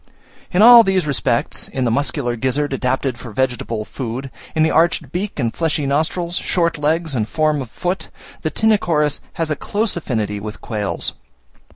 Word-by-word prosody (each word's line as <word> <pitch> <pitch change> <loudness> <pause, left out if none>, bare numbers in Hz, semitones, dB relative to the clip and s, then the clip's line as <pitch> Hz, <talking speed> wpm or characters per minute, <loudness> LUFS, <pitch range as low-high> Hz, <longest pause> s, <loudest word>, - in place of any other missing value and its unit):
In 185 +3 +4
all 240 0 +11
these 190 -5 +1
respects, 130 -4 0
in 130 - -3
the 115 - +1
muscular 135 -1 0
gizzard 135 +4 -1
adapted 130 -1 -1
for 120 - -8
vegetable 120 -2 -2
food, 130 +4 -5 0.2
in 155 - +3
the 160 - +2
arched 165 +1 +2
beak 190 +4 -3
and 120 -5 -1
fleshy 160 -3 0
nostrils, 165 +5 0
short 170 -3 0
legs 160 +1 0
and 110 -4 -1
form 155 -2 +1
of 125 - -7
foot, 180 +9 -3 0.3
the 155 - -1
Tinochorus 170 -9 +2
has 165 -2 -2
a - - +1
close 210 +8 -1
affinity 110 -10 -2
with 105 +1 -7
quails. 105 -3 -2
145 Hz, 170 wpm, -19 LUFS, 125-170 Hz, 0.3 s, all